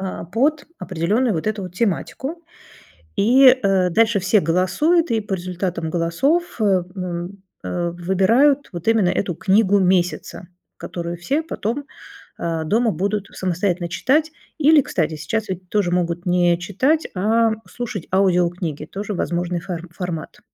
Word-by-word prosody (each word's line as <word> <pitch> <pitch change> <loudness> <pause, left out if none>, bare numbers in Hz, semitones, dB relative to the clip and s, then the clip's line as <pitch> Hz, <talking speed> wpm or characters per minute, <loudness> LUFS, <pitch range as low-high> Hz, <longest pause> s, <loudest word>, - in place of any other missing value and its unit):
Э, 190 -2 -5
под 285 +6 +1
определенную 205 +6 0
вот 160 - -3
эту 215 -2 -1
вот 180 -1 -8
тематику, 265 - -2 0.7
и, 240 +7 +5
э, 195 -8 +4
дальше 225 +1 +3
все 190 +3 +3
голосуют, 230 - +2
и 225 - +2
по 205 -1 -5
результатам 180 -2 -3
голосов, 245 - 0
э, 190 -4 +3
м, 180 +1 -5 0.2
э, 175 -1 -2
выбирают 195 +11 +2
вот 175 +4 -7
именно 220 -5 +3
эту 180 -3 -1
книгу 200 +1 +3
месяца, 180 -1 0 0.3
которую 170 0 -5
все 280 - -1
потом, 275 -1 -3 0.5
э, 165 -1 -2
дома 225 +6 +2
будут 200 +1 -2
самостоятельно 180 -1 -1
читать. 300 - +1 0.3
Или, 310 -1 +5
кстати, 165 -9 -1
сейчас 220 +7 -3
ведь 185 -1 -6
тоже 200 -4 +1
могут 175 0 -1
не 175 -1 +3
читать, 260 - +1
а 225 +4 +2 0.2
слушать 240 -7 -5
аудиокниги, 175 -5 +1
тоже 205 +5 -5
возможный 175 0 -2
фор 175 -1 -6
формат. 170 -3 -6
190 Hz, 140 wpm, -21 LUFS, 175-230 Hz, 0.7 s, и